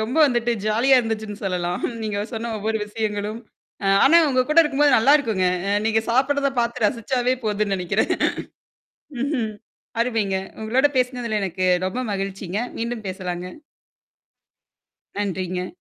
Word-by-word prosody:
ரொம்ப 225 Hz, +6 st, -2 dB
வந்துட்டு 240 Hz, -2 st, +1 dB
ஜாலியா 235 Hz, +5 st, +4 dB
இருந்துச்சுன்னு 220 Hz, -2 st, -4 dB
சொல்லலாம். 180 Hz, -2 st, -2 dB, 0.2 s
நீங்க 210 Hz, -2 st, -2 dB
சொன்ன 230 Hz, +1 st, -4 dB
ஒவ்வொரு 220 Hz, +1 st, -1 dB
விஷயங்களும். 210 Hz, 0 st, -3 dB, 0.4 s
அ -, -, +1 dB, 0.2 s
ஆனா, 335 Hz, -, +7 dB
உங்க 255 Hz, -1 st, +3 dB
கூட 305 Hz, -, +4 dB
இருக்கும்போது 290 Hz, -2 st, +3 dB
நல்லாருக்குங்க. 230 Hz, -7 st, +3 dB, 0.2 s
அ -, -, +1 dB
நீங்க 220 Hz, 0 st, +2 dB
சாப்படுறத 275 Hz, +3 st, +2 dB
பாத்து 235 Hz, -1 st, -1 dB
ரசிச்சாவே 245 Hz, +2 st, 0 dB
போதுன்னு 210 Hz, -1 st, 0 dB
நெனைக்கிறேன். 180 Hz, -2 st, 0 dB, 1.1 s
ம்ஹ்ம். 260 Hz, -6 st, -1 dB, 0.5 s
அருமைங்க. 225 Hz, -5 st, 0 dB, 0.3 s
உங்களோட 250 Hz, +6 st, +3 dB
பேசினதுல 245 Hz, -3 st, -1 dB
எனக்கு 185 Hz, -1 st, -2 dB, 0.2 s
ரொம்ப 215 Hz, +7 st, -3 dB
மகிழ்ச்சிங்க. 195 Hz, -1 st, -3 dB, 0.2 s
மீண்டும் 230 Hz, -1 st, -4 dB
பேசலாங்க. 180 Hz, -2 st, -4 dB, 1.7 s
நன்றிங்க. 185 Hz, -2 st, -2 dB
220 Hz, 120 wpm, -22 LUFS, 200-250 Hz, 1.7 s, ஆனா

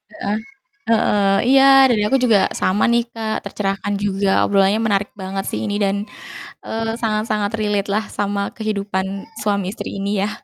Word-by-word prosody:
Heeh, 205 Hz, +2 st, -4 dB, 0.5 s
heeh, 205 Hz, -3 st, +3 dB
iya, 270 Hz, 0 st, +6 dB, 0.3 s
dari 220 Hz, -3 st, +2 dB
aku 270 Hz, -, +2 dB
juga 225 Hz, -4 st, +5 dB, 0.2 s
sama 190 Hz, +3 st, +2 dB
nih 235 Hz, 0 st, +2 dB
Kak, 220 Hz, -1 st, -3 dB
tercerahkan 200 Hz, 0 st, -2 dB
juga, 195 Hz, -1 st, 0 dB
obrolannya 200 Hz, +2 st, +2 dB
menarik 205 Hz, -1 st, 0 dB
banget 195 Hz, 0 st, -4 dB
sih 105 Hz, -, -3 dB
ini, 205 Hz, -, -2 dB
dan, 195 Hz, 0 st, +1 dB, 0.7 s
eee, 225 Hz, 0 st, -2 dB
sangat-sangat 215 Hz, -2 st, -1 dB
relate 205 Hz, -2 st, 0 dB
lah 215 Hz, +1 st, 0 dB
sama 200 Hz, 0 st, -2 dB
kehidupan 200 Hz, -3 st, -2 dB, 0.4 s
suami 200 Hz, -3 st, 0 dB
istri -, -, -6 dB
ini 200 Hz, +1 st, -1 dB
ya. -, -, -1 dB
205 Hz, 155 wpm, -19 LUFS, 195-215 Hz, 0.7 s, iya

